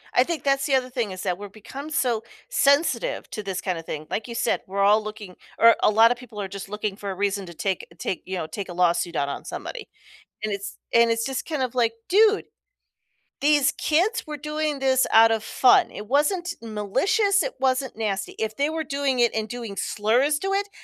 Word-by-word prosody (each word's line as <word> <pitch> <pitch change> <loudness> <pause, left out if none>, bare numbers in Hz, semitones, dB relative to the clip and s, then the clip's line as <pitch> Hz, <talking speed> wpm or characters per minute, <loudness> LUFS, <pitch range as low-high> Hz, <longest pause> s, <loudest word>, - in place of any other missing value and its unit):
I 250 - +6
think 330 +3 -4
that's 275 -1 +2
the 280 - 0
other 255 -1 +2
thing 240 -5 -2
is 185 0 -7
that 180 -2 -1
we're 205 +1 -7
become 265 +9 -9
so 240 -7 0 0.3
sensitive 285 - +2
to 215 - -6
this 195 -2 -3
kinda 175 -4 -3
thing, 155 -1 -6
like 215 - -3
you 235 - -6
said, 230 - 0
we're 195 +1 -2
all 210 +2 +5
looking 210 -3 -8 0.2
or 230 0 +7
a - - +5
lotta 225 +3 +5
people 240 -4 -9
are 195 - -3
just 195 0 -7
looking 210 0 -3
for 200 -1 -5
a - - -5
reason 200 0 -1
to 170 - -10
take 190 +2 -2
take, 185 - -3
you 190 - -4
know, 160 - -3
take 190 +4 -6
a - - -6
lawsuit 175 -1 +1
out 140 -2 0
on - - -6
somebody. 480 -3 -6 0.6
And 215 -1 -2
it's 200 0 -5 0.2
and 235 0 +5
it's 230 0 +1
just 270 -1 -3
kind 305 -5 -1
of 255 -1 -2
like, 230 -2 +2
"Dude, 425 +2 +4 1.0
these 290 -1 +4
kids 365 +10 +1
were 300 -1 -6
doing 300 0 -2
this 260 -1 +3
out 225 +1 +7
of 220 -1 0
fun. 250 +3 +4
It 210 - -8
wasn't 345 - +1
malicious, 375 - +1
it - - -4
wasn't 260 -2 0
nasty." 200 -3 -2
If 220 0 -2
they 285 +4 +1
were 320 0 -3
doing 275 -2 -1
it 235 -1 +3
and 220 0 -2
doing 235 -5 -6
slurs 240 +10 +1
to 390 0 -2
it, 400 +1 0
230 Hz, 220 wpm, -24 LUFS, 200-285 Hz, 1.0 s, or